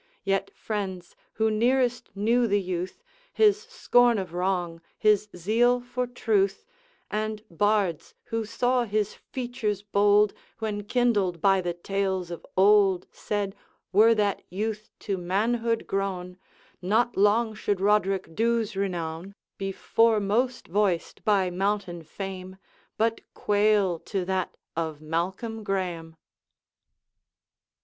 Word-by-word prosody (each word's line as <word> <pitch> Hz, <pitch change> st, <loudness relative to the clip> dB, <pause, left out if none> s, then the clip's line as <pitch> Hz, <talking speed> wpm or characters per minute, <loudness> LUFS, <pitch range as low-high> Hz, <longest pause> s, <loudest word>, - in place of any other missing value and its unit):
Yet 195 Hz, 0 st, 0 dB
friends, 190 Hz, -5 st, -5 dB, 0.2 s
who 220 Hz, 0 st, +1 dB
nearest 245 Hz, +2 st, +1 dB
knew 230 Hz, +4 st, +2 dB
the 205 Hz, -1 st, +2 dB
youth 185 Hz, -, -4 dB, 0.3 s
His 420 Hz, -1 st, +4 dB
scorn 245 Hz, -, +3 dB
of 185 Hz, -4 st, -4 dB
wrong, 175 Hz, -2 st, -1 dB, 0.2 s
his 210 Hz, -1 st, +3 dB
zeal 235 Hz, +7 st, +3 dB
for 245 Hz, 0 st, -3 dB
truth 210 Hz, -, 0 dB, 0.5 s
And 215 Hz, 0 st, -2 dB
bards, 200 Hz, -2 st, 0 dB
who 225 Hz, 0 st, -3 dB
saw 245 Hz, +3 st, +1 dB
his 210 Hz, -1 st, -1 dB
features 240 Hz, -6 st, -4 dB
bold 205 Hz, 0 st, +3 dB, 0.2 s
When 210 Hz, -2 st, -3 dB
kindled 210 Hz, -7 st, +1 dB
by 195 Hz, +2 st, +4 dB
the 175 Hz, -1 st, -3 dB
tales 190 Hz, -1 st, -2 dB
of 170 Hz, -, -7 dB
old 195 Hz, -2 st, +5 dB
Said, 205 Hz, -2 st, -3 dB, 0.4 s
were 225 Hz, +3 st, +6 dB
that 205 Hz, -2 st, 0 dB
youth 215 Hz, +3 st, -3 dB
to 200 Hz, -3 st, -2 dB
manhood 225 Hz, +6 st, 0 dB
grown, 185 Hz, -2 st, -3 dB, 0.4 s
Not 220 Hz, +6 st, +1 dB
long 215 Hz, +3 st, +3 dB
should 205 Hz, -2 st, -1 dB
Roderick 195 Hz, -3 st, +1 dB
Dhu's 225 Hz, 0 st, 0 dB
renown 180 Hz, -1 st, -3 dB, 0.2 s
Be 195 Hz, 0 st, -2 dB
foremost 225 Hz, +4 st, +1 dB
voiced 185 Hz, -3 st, 0 dB
by 195 Hz, -4 st, +2 dB
mountain 190 Hz, -2 st, -1 dB
fame, 185 Hz, +2 st, -7 dB, 0.4 s
But 225 Hz, +1 st, +1 dB
quail 205 Hz, -4 st, +2 dB
to 190 Hz, +1 st, -3 dB
that 190 Hz, -1 st, -2 dB, 0.2 s
of 160 Hz, -2 st, -3 dB
Malcolm 190 Hz, +8 st, -3 dB
Graeme. 175 Hz, -5 st, -3 dB
205 Hz, 120 wpm, -26 LUFS, 185-225 Hz, 0.5 s, were